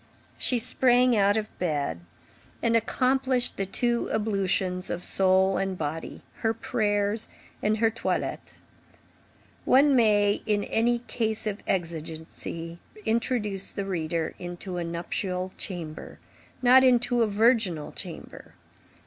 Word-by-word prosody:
She 250 Hz, -, +1 dB
sprang 250 Hz, +1 st, +3 dB
out 205 Hz, 0 st, +3 dB
of 215 Hz, -1 st, -4 dB
bed 145 Hz, -, -1 dB, 0.6 s
and 230 Hz, 0 st, +3 dB
accomplished 255 Hz, +2 st, +1 dB
the 195 Hz, -, -2 dB
two 235 Hz, +4 st, 0 dB
ablutions 195 Hz, -3 st, 0 dB
of 175 Hz, -, -3 dB
soul 190 Hz, 0 st, +3 dB
and 190 Hz, -1 st, -2 dB
body, 160 Hz, +1 st, -5 dB
her 225 Hz, 0 st, 0 dB
prayers 210 Hz, -1 st, 0 dB, 0.3 s
and 215 Hz, +1 st, +1 dB
her 225 Hz, 0 st, +3 dB
toilet. 230 Hz, -, -3 dB, 1.1 s
One 275 Hz, +1 st, +5 dB
may, 205 Hz, -3 st, +3 dB
in 205 Hz, -1 st, +1 dB
a 240 Hz, +2 st, +1 dB
case 220 Hz, -1 st, -2 dB
of 210 Hz, -1 st, -3 dB
exigency, 165 Hz, 0 st, -4 dB, 0.3 s
introduce 220 Hz, -4 st, -1 dB
the 200 Hz, -, -4 dB
reader 165 Hz, -3 st, -2 dB
into 175 Hz, +1 st, -6 dB
a 175 Hz, -, -1 dB
nuptial 180 Hz, +2 st, -3 dB
chamber, 165 Hz, -5 st, -6 dB, 0.5 s
not 255 Hz, +1 st, +7 dB
into 245 Hz, -1 st, +3 dB
a 225 Hz, -, +4 dB
virginal 210 Hz, -7 st, +2 dB
chamber. -, -, -8 dB
205 Hz, 120 wpm, -27 LUFS, 180-230 Hz, 1.1 s, not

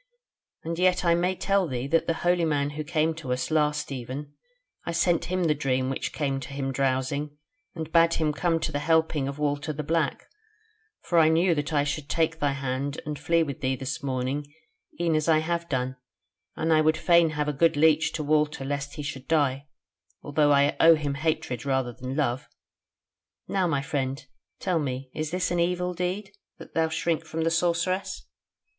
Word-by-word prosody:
And 165 Hz, +1 st, -4 dB
I 180 Hz, -1 st, +3 dB
may 180 Hz, +2 st, +1 dB
tell 195 Hz, -1 st, +1 dB
thee 125 Hz, -3 st, -3 dB
that 165 Hz, +4 st, +1 dB
the 165 Hz, -, +1 dB
holy 175 Hz, -1 st, +3 dB
man 145 Hz, -3 st, +1 dB
who 155 Hz, +1 st, -4 dB
came 160 Hz, +1 st, +1 dB
to 155 Hz, -5 st, -6 dB
us 125 Hz, +2 st, -2 dB
last 150 Hz, -2 st, +1 dB
even, 135 Hz, +3 st, -6 dB, 0.5 s
I 170 Hz, -, -4 dB
sent 170 Hz, 0 st, +2 dB
him 185 Hz, 0 st, -1 dB
the 160 Hz, -3 st, +3 dB
dream 130 Hz, -2 st, 0 dB
which 135 Hz, -, -3 dB
came 135 Hz, -3 st, -1 dB
to 135 Hz, -, -8 dB
him 135 Hz, -1 st, -2 dB
drowsing, 135 Hz, +2 st, -1 dB, 0.4 s
and 160 Hz, -1 st, -5 dB
bade 165 Hz, 0 st, +4 dB
him 155 Hz, -2 st, 0 dB
come 165 Hz, +1 st, +1 dB
to -, -, -1 dB
the 145 Hz, -, -1 dB
helping 160 Hz, -2 st, +1 dB
of 140 Hz, +1 st, -5 dB
Walter 145 Hz, 0 st, -1 dB
the 150 Hz, 0 st, -4 dB
Black: 160 Hz, -1 st, -1 dB, 0.7 s
for 170 Hz, -, +2 dB
I 160 Hz, -1 st, +6 dB
knew 170 Hz, +2 st, +3 dB
that 145 Hz, -1 st, -2 dB
I 145 Hz, -2 st, +2 dB
should 145 Hz, 0 st, -3 dB
take 165 Hz, 0 st, 0 dB
thy 145 Hz, -2 st, +1 dB
hand 135 Hz, +1 st, -3 dB
and 150 Hz, -1 st, -4 dB
flee 165 Hz, 0 st, +2 dB
with 140 Hz, -4 st, -6 dB
thee 130 Hz, 0 st, +1 dB
this 130 Hz, 0 st, -4 dB
morning 135 Hz, +2 st, -2 dB, 0.5 s
e'en 170 Hz, -1 st, +1 dB
as 155 Hz, +1 st, +1 dB
I 160 Hz, -, +6 dB
have 170 Hz, +2 st, -2 dB
done: 130 Hz, -1 st, -2 dB, 0.6 s
and 160 Hz, 0 st, +1 dB
I 155 Hz, -, +5 dB
would 155 Hz, 0 st, +3 dB
fain 170 Hz, 0 st, +4 dB
have 150 Hz, 0 st, 0 dB
a 150 Hz, -, 0 dB
good 155 Hz, +2 st, +2 dB
leech 160 Hz, +1 st, +4 dB
to 155 Hz, -, -2 dB
Walter 150 Hz, -2 st, +1 dB
lest 145 Hz, +1 st, -3 dB
he 150 Hz, -, -5 dB
should 135 Hz, -2 st, -6 dB
die, 145 Hz, -3 st, +1 dB, 0.6 s
although 145 Hz, 0 st, +2 dB
I 140 Hz, 0 st, +4 dB
owe 165 Hz, 0 st, +8 dB
him 145 Hz, -2 st, -2 dB
hatred 145 Hz, -5 st, -2 dB
rather 130 Hz, -3 st, 0 dB
than 130 Hz, +3 st, -6 dB
love. 130 Hz, -4 st, -1 dB, 1.0 s
Now, 190 Hz, -2 st, +1 dB
my 140 Hz, -4 st, 0 dB
friend, 135 Hz, 0 st, -3 dB, 0.3 s
tell 180 Hz, -3 st, 0 dB
me, 130 Hz, -2 st, -4 dB
is 155 Hz, -1 st, -3 dB
this 180 Hz, +2 st, -1 dB
an 175 Hz, -, 0 dB
evil 180 Hz, +1 st, 0 dB
deed, 185 Hz, +3 st, -3 dB, 0.3 s
and -, -, -10 dB
dost -, -, -37 dB
thou 160 Hz, 0 st, +1 dB
shrink 165 Hz, 0 st, -1 dB
from 160 Hz, 0 st, -4 dB
the 165 Hz, -, +1 dB
Sorceress?" 180 Hz, +3 st, 0 dB
150 Hz, 200 wpm, -26 LUFS, 140-165 Hz, 1.0 s, owe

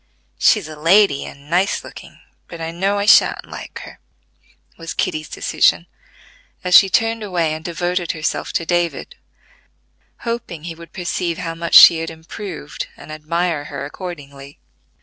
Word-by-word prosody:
"She's 210 Hz, -8 st, +3 dB
a 155 Hz, -, -9 dB
lady 165 Hz, 0 st, +3 dB
and 140 Hz, 0 st, -13 dB
nice 180 Hz, +5 st, 0 dB
looking, -, -, -13 dB, 0.3 s
but 170 Hz, -, -10 dB
I 165 Hz, 0 st, -4 dB
know 195 Hz, +4 st, -1 dB
I 200 Hz, -, -1 dB
shan't -, -, +5 dB
like -, -, -9 dB
her," -, -, -13 dB, 0.8 s
was 165 Hz, 0 st, -7 dB
Kitty's 155 Hz, -4 st, -2 dB
decision, -, -, +1 dB, 0.8 s
as 180 Hz, 0 st, -1 dB
she 195 Hz, -, +8 dB
turned 225 Hz, +3 st, +1 dB
away 175 Hz, -6 st, -1 dB
and 155 Hz, 0 st, -7 dB
devoted 175 Hz, +1 st, -2 dB
herself 155 Hz, 0 st, -3 dB
to 165 Hz, -, -1 dB
David, 175 Hz, -1 st, -1 dB, 1.1 s
hoping 230 Hz, -9 st, -5 dB
he 170 Hz, 0 st, -6 dB
would 170 Hz, +1 st, -14 dB
perceive 175 Hz, -1 st, -3 dB
how 165 Hz, -1 st, -4 dB
much 170 Hz, 0 st, -2 dB
she 165 Hz, -, +10 dB
had 165 Hz, -, -4 dB
improved 165 Hz, 0 st, -8 dB
and -, -, -12 dB
admire 155 Hz, 0 st, -2 dB
her 140 Hz, -1 st, -6 dB
accordingly. 145 Hz, -4 st, -9 dB
170 Hz, 150 wpm, -19 LUFS, 155-180 Hz, 1.1 s, she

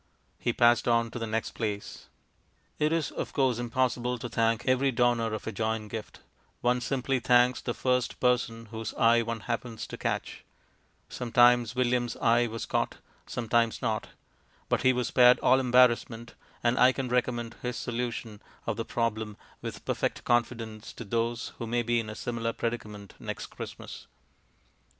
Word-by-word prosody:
He 120 Hz, -, 0 dB
passed 120 Hz, 0 st, +4 dB
on 115 Hz, -1 st, +2 dB
to 120 Hz, -, -5 dB
the 115 Hz, -, -3 dB
next 110 Hz, +1 st, -2 dB
place.... 105 Hz, -3 st, -5 dB, 0.7 s
It 150 Hz, +1 st, +2 dB
is, 165 Hz, -3 st, 0 dB
of -, -, -5 dB
course, 130 Hz, -4 st, +2 dB
impossible 125 Hz, 0 st, 0 dB
to 120 Hz, +1 st, -6 dB
thank 115 Hz, 0 st, +1 dB
every 130 Hz, +1 st, +3 dB
donor 120 Hz, -2 st, +2 dB
of 110 Hz, -, -4 dB
a -, -, -3 dB
joint 110 Hz, 0 st, -2 dB
gift; 110 Hz, -2 st, -7 dB, 0.4 s
one 125 Hz, 0 st, +2 dB
simply 135 Hz, +1 st, 0 dB
thanks 125 Hz, 0 st, +4 dB
the 120 Hz, -, -3 dB
first 125 Hz, -1 st, 0 dB
person 115 Hz, -2 st, +1 dB
whose 110 Hz, -1 st, -5 dB
eye 115 Hz, +1 st, +5 dB
one 115 Hz, -1 st, -4 dB
happens 115 Hz, 0 st, -4 dB
to -, -, -9 dB
catch. -, -, -3 dB, 0.6 s
Sometimes 120 Hz, -1 st, +3 dB
William's 125 Hz, -1 st, +1 dB
eye 120 Hz, +1 st, +3 dB
was 115 Hz, 0 st, -5 dB
caught, -, -, -1 dB, 0.3 s
sometimes 115 Hz, -1 st, +1 dB
not. 110 Hz, -3 st, -1 dB, 0.6 s
But -, -, +1 dB
he 130 Hz, -, +5 dB
was 125 Hz, -1 st, -1 dB
spared 125 Hz, 0 st, +7 dB
all 130 Hz, +1 st, +5 dB
embarrassment; 120 Hz, -2 st, +3 dB, 0.3 s
and 120 Hz, +1 st, +2 dB
I 130 Hz, +1 st, +6 dB
can 135 Hz, -1 st, -3 dB
recommend 120 Hz, -2 st, -1 dB
his 125 Hz, -2 st, -3 dB
solution 115 Hz, -3 st, -4 dB, 0.2 s
of -, -, -2 dB
the -, -, -3 dB
problem 110 Hz, -3 st, -2 dB, 0.2 s
with -, -, -7 dB
perfect -, -, -1 dB
confidence 115 Hz, -2 st, -1 dB
to -, -, -8 dB
those 115 Hz, +2 st, -1 dB
who 115 Hz, -, -4 dB
may 120 Hz, +1 st, 0 dB
be 120 Hz, +1 st, +1 dB
in 110 Hz, -2 st, -4 dB
a 110 Hz, -, -6 dB
similar 115 Hz, -1 st, -3 dB
predicament 105 Hz, -4 st, -5 dB
next -, -, -5 dB
Christmas. -, -, -8 dB
120 Hz, 165 wpm, -28 LUFS, 115-125 Hz, 0.7 s, spared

